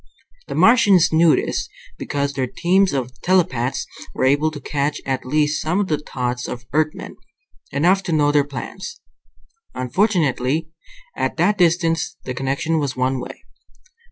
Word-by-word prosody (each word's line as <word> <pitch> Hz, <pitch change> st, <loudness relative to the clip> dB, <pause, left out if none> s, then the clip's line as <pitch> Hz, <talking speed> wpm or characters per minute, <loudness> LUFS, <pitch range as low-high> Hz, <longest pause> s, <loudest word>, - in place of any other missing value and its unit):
The -, -, -5 dB
Martians 205 Hz, -9 st, +5 dB
knew 160 Hz, 0 st, +5 dB
this, -, -, -2 dB, 0.3 s
because 140 Hz, 0 st, -2 dB
their 130 Hz, -2 st, -1 dB
teams 185 Hz, +8 st, +2 dB
of 130 Hz, -2 st, -4 dB
telepaths 165 Hz, -9 st, +1 dB, 0.3 s
were -, -, -1 dB
able 145 Hz, +4 st, +3 dB
to 155 Hz, -2 st, -8 dB
catch 145 Hz, +1 st, -2 dB
at 130 Hz, -1 st, -2 dB
least 150 Hz, +2 st, +1 dB
some 170 Hz, +5 st, 0 dB
of 205 Hz, -, -1 dB
the 150 Hz, -, +1 dB
thoughts 125 Hz, -4 st, -4 dB
of 120 Hz, 0 st, -7 dB
Earthmen, 155 Hz, 0 st, -1 dB, 0.5 s
enough 175 Hz, +7 st, +3 dB
to 175 Hz, -, -2 dB
know 150 Hz, -2 st, +3 dB
their 145 Hz, -1 st, +3 dB
plans. 145 Hz, -, -7 dB, 0.8 s
Unfortunately, 155 Hz, -, 0 dB, 0.4 s
at -, -, -2 dB
that 190 Hz, +4 st, +2 dB
distance, 165 Hz, -2 st, +1 dB
the 125 Hz, -, -4 dB
connection 135 Hz, +5 st, -1 dB
was 140 Hz, -3 st, -2 dB
one 130 Hz, +1 st, 0 dB
way. -, -, -9 dB
150 Hz, 150 wpm, -21 LUFS, 135-170 Hz, 0.8 s, Martians